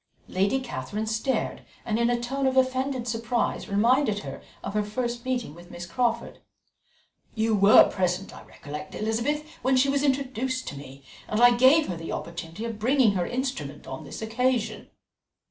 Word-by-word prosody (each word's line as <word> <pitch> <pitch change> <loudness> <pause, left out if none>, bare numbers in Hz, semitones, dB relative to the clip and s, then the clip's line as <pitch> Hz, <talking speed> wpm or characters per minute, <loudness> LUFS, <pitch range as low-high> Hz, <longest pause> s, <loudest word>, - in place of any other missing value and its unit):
Lady 200 +8 +1
Catherine 220 -4 -4
stared, 220 +4 -1 0.2
and 220 0 0
in 235 0 +3
a 240 0 +1
tone 265 +3 -1
of 265 0 0
offended 260 -1 +1
surprise 230 0 -1
reminded 215 +1 +2
her - - -7 0.2
of 195 - -4
the 210 - +2
first 235 +3 -3
meeting 250 - -2
with 175 +2 -14
Miss 175 0 -7
Crawford. 235 +5 -1 1.0
"You 220 0 +1
were 200 +1 +8
present, 185 0 -2
I - - -11
recollect, 150 -1 -8
Elizabeth, 235 +8 -1
when 260 +1 +3
she 270 +2 +4
was 280 0 +1
introduced 260 -2 -1
to - - -8
me, 140 -1 -11 0.2
and 215 - -1
I 245 0 +7
gave 265 +6 +6
her 175 - -3
the 165 0 -5
opportunity 170 +5 -6
of 225 -2 -5
bringing 250 0 +4
her 180 -3 -1
instrument 240 - -4
on 135 +4 -7
this 145 +9 -7
occasion." 225 -2 -1
230 Hz, 170 wpm, -26 LUFS, 200-255 Hz, 1.0 s, were